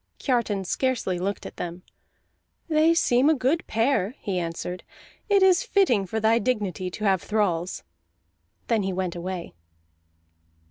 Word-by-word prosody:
Kiartan 225 Hz, -7 st, 0 dB
scarcely 240 Hz, -5 st, -1 dB
looked 200 Hz, +3 st, -3 dB
at -, -, -9 dB
them. 175 Hz, +1 st, -6 dB, 0.8 s
"They 320 Hz, +1 st, +4 dB
seem 255 Hz, -3 st, +3 dB
a 315 Hz, -, +4 dB
good 275 Hz, +6 st, 0 dB
pair," 225 Hz, -1 st, +1 dB
he 190 Hz, -4 st, -2 dB
answered. 175 Hz, +1 st, -4 dB, 0.5 s
"It 400 Hz, -2 st, +5 dB
is 375 Hz, -2 st, +5 dB
fitting 370 Hz, -, +2 dB
for 220 Hz, +5 st, -2 dB
thy 220 Hz, +1 st, +3 dB
dignity 200 Hz, -6 st, -1 dB
to 210 Hz, -, -7 dB
have 190 Hz, -4 st, +2 dB
thralls." 185 Hz, -3 st, -1 dB, 0.8 s
Then 225 Hz, -3 st, +1 dB
he 190 Hz, -1 st, -2 dB
went 180 Hz, -1 st, -2 dB
away. 175 Hz, 0 st, -5 dB
210 Hz, 140 wpm, -25 LUFS, 185-260 Hz, 0.8 s, It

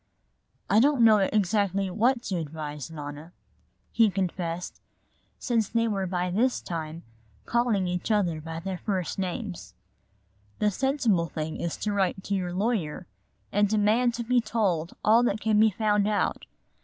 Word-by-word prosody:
"I 210 Hz, -, +4 dB
don't 275 Hz, 0 st, +4 dB
know 220 Hz, -2 st, +7 dB
exactly 200 Hz, -1 st, +1 dB
what 235 Hz, +5 st, +2 dB
to 190 Hz, -, -2 dB
advise, 150 Hz, -2 st, -5 dB
Nona," 150 Hz, +1 st, -8 dB, 0.6 s
he 225 Hz, -2 st, +4 dB
confessed, 180 Hz, -2 st, -3 dB, 0.6 s
since 230 Hz, -5 st, 0 dB
they 230 Hz, 0 st, +1 dB
were 195 Hz, -3 st, -1 dB
by 180 Hz, 0 st, -1 dB
this 245 Hz, +7 st, +1 dB
time 165 Hz, -1 st, -6 dB, 0.4 s
calling 235 Hz, -5 st, +1 dB
each 180 Hz, +2 st, -3 dB
other 180 Hz, -7 st, +1 dB
by 165 Hz, +1 st, -6 dB
their 190 Hz, 0 st, -4 dB
first 190 Hz, -3 st, -2 dB
names. 185 Hz, 0 st, -5 dB, 0.8 s
"The 210 Hz, 0 st, +2 dB
sensible 235 Hz, -, +1 dB
thing 155 Hz, -1 st, -4 dB
is 170 Hz, -, -3 dB
to 210 Hz, -, -2 dB
write 190 Hz, -1 st, 0 dB
to 200 Hz, -, -3 dB
your 185 Hz, -2 st, -1 dB
lawyer 185 Hz, -4 st, -1 dB, 0.5 s
and 205 Hz, 0 st, +2 dB
demand 220 Hz, +3 st, +2 dB
to 235 Hz, -, -3 dB
be 245 Hz, +1 st, +2 dB
told 195 Hz, -7 st, -1 dB
all 225 Hz, +3 st, +6 dB
that 220 Hz, -3 st, 0 dB
can 215 Hz, -1 st, +2 dB
be 220 Hz, 0 st, +6 dB
found 210 Hz, 0 st, +1 dB
out. 210 Hz, -1 st, -1 dB
200 Hz, 155 wpm, -27 LUFS, 175-220 Hz, 0.8 s, know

